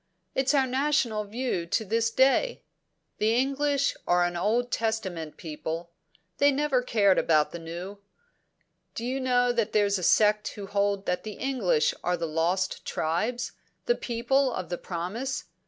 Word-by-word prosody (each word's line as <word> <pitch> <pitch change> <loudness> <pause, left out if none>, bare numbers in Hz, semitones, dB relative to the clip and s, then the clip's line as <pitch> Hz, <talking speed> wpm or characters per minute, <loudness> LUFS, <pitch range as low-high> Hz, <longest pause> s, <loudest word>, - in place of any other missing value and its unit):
It's 270 +2 +2
our 270 -2 +4
national 260 -5 +1
view 215 -5 -2
to 220 - 0
this 230 +3 +1
day. 270 - +2 0.6
The 220 +2 +2
English 275 +2 +1
are 175 0 +4
an 175 0 -2
Old 230 +7 0
Testament 190 -9 -2
people; 165 +1 -5 0.5
they 285 0 +5
never 280 -2 +1
cared 205 -6 +3
about 155 -2 +3
the 170 - -6
New. 175 +5 -7 1.0
Do 230 - -4
you 260 +2 -1
know 245 -1 +2
that 230 -3 -1
there's 205 -2 +2
a - - -6
sect 210 +3 +4
who 205 -2 -7
hold 200 0 0
that 180 - -1
the 215 - -6
English 230 - +1
are 180 0 +1
the 165 - -2
Lost 170 +4 -1
Tribes 215 +11 -1 0.3
the 480 - +3
People 260 - 0
of 185 -7 -5
the 175 - -2
Promise? 195 +10 -4
215 Hz, 155 wpm, -27 LUFS, 180-255 Hz, 1.0 s, they